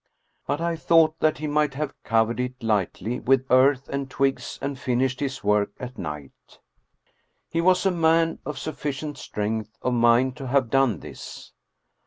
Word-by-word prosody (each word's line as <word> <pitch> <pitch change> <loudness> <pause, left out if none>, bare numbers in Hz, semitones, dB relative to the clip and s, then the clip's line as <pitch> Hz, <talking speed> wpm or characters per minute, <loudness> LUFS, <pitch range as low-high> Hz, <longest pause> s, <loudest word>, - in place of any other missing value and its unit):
But 145 +3 -1
I 170 0 -1
thought 160 -1 +3
that 155 0 +2
he 155 - -5
might 150 -2 +1
have 150 +1 -3
covered 115 0 +1
it 125 0 -4
lightly 110 +2 -1
with 130 0 +2
earth 130 +1 +4
and 140 -1 -4
twigs 135 0 -1
and 140 -1 -4
finished 130 0 0
his 135 -1 -3
work 105 0 +2
at 125 -1 -8
night. 75 -2 -8 0.9
He 165 - +1
was 185 +2 +3
a 190 - +4
man 165 -1 +2
of 150 -2 -5
sufficient 150 -1 -4
strength 110 0 -4
of 125 - +1
mind 120 +2 +3
to 135 -3 -6
have 130 -2 +1
done 135 -8 +2
this. - - -10
135 Hz, 165 wpm, -24 LUFS, 120-150 Hz, 0.9 s, earth